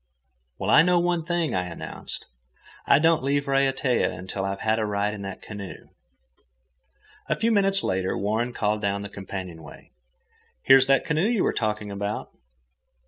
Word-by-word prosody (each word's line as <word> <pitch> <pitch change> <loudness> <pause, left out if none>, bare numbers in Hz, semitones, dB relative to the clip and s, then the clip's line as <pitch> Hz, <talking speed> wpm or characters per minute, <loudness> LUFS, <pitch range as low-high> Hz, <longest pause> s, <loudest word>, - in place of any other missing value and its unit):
"Well, - - -1
I - - +8
know 180 +2 +3
one 175 -1 +1
thing," 175 -2 -1
I 90 -1 0
announced; 85 -2 -7 0.6
"I - - +6
don't 165 +2 +3
leave 140 +1 0
Raiatea 135 -7 +1
till 95 0 -3
I 95 0 -2
have 110 +1 +1
a - - 0
ride 105 0 -1
in 105 - -7
that 95 -1 -7
canoe." 100 -3 -9 1.4
A - - +2
few 230 +1 +1
minutes 195 -2 +3
later 95 0 -1
Warren 110 +4 -1
called 105 -2 -1
down 100 0 -1
the 100 - -7
companionway, 95 -5 -9 0.7
"Here's 135 0 +7
that 135 0 +3
canoe 160 +5 +1
you 230 -4 +1
were - - +1
talking 105 -2 -2
about." 100 +1 -4
110 Hz, 160 wpm, -25 LUFS, 100-150 Hz, 1.4 s, I